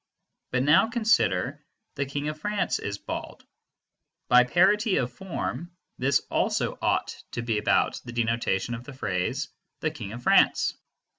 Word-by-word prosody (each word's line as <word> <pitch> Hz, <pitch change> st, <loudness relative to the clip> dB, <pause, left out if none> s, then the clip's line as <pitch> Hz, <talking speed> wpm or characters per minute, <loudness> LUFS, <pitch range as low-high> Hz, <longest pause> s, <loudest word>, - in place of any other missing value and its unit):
But 125 Hz, 0 st, 0 dB
now 150 Hz, +9 st, +5 dB
consider 230 Hz, -1 st, +1 dB, 0.3 s
"the 140 Hz, -1 st, -2 dB
King 145 Hz, +2 st, -3 dB
of 155 Hz, 0 st, -6 dB
France 205 Hz, +4 st, -1 dB
is 100 Hz, 0 st, -4 dB
bald." -, -, -7 dB, 0.8 s
By 125 Hz, 0 st, +7 dB
parity 195 Hz, -, +3 dB
of 125 Hz, -1 st, -1 dB
form, 175 Hz, 0 st, -5 dB, 0.2 s
this 135 Hz, +2 st, +2 dB
also -, -, 0 dB
ought -, -, +1 dB, 0.2 s
to 120 Hz, -, -3 dB
be 115 Hz, -3 st, 0 dB
about 105 Hz, -, +1 dB
the 120 Hz, -, -8 dB
denotation 115 Hz, -2 st, 0 dB
of 115 Hz, 0 st, -6 dB
the 145 Hz, -, -10 dB
phrase 125 Hz, +4 st, -2 dB, 0.3 s
"the 155 Hz, -, 0 dB
King 115 Hz, -10 st, -7 dB
of 120 Hz, +1 st, -8 dB
France." -, -, +4 dB
135 Hz, 150 wpm, -26 LUFS, 120-170 Hz, 0.8 s, By